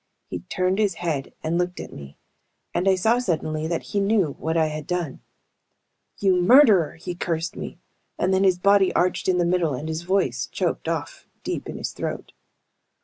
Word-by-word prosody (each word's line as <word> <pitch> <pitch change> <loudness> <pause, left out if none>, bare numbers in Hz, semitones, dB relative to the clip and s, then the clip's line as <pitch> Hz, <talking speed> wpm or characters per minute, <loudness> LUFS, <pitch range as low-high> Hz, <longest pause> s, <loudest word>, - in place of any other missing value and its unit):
He - - -3
turned 185 +1 -1
his 205 -2 +2
head 155 -6 -3
and 165 +2 0
looked 180 0 -2
at - - -8
me, 70 0 -11 0.6
and 190 +2 +2
I 190 - +5
saw 225 +6 +2
suddenly 155 -7 -1
that 170 0 -2
he 205 - +2
knew 195 -7 +2
what 160 +1 -1
I 160 - +4
had 155 -1 -5
done. 175 -6 -2 1.0
"You 185 -3 +3
murderer!" 210 - +6
he 175 +2 -6
cursed 170 -1 -2
me, - - -7 0.4
and 185 +1 +1
then 190 +1 +3
his 185 -2 +4
body 200 +1 +4
arched 180 +1 +1
in 180 - +3
the 175 - +2
middle 170 -5 +1
and 150 +5 -5
his 160 0 -3
voice 170 -9 0
choked - - -2
off - - -4 0.2
deep - - -4
in - - -5
his - - -4
throat. - - -5
180 Hz, 190 wpm, -24 LUFS, 160-190 Hz, 1.0 s, murderer